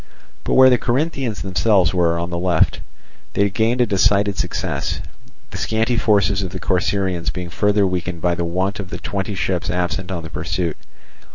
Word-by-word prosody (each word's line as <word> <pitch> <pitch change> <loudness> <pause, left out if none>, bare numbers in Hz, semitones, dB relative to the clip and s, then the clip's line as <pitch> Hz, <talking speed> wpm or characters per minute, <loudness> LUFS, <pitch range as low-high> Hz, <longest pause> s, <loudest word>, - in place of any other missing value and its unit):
But - - 0
where 130 0 +8
the 125 - +4
Corinthians 130 -3 -1
themselves 95 -1 +2
were, 85 -2 +2
on 85 +1 -3
the 85 - -2
left, 90 -3 +2 0.5
they 100 0 +2
gained 115 +4 +1
a - - +5
decided 100 -1 +2
success; - - -2 0.5
the - - -6
scanty 115 +2 0
forces 100 -4 +2
of 95 - -3
the 95 +1 -6
Corcyraeans 90 -1 0
being 90 -1 -6
further 105 +2 +2
weakened 90 -2 -2
by 85 +1 +1
the 85 - -2
want 95 +5 -1
of 95 -3 -6
the - - -5
twenty 100 0 -3
ships 90 0 -1
absent 90 +1 -2
on 85 -3 -4
the 80 - -9
pursuit. 80 +1 -2
95 Hz, 180 wpm, -20 LUFS, 90-105 Hz, 0.5 s, where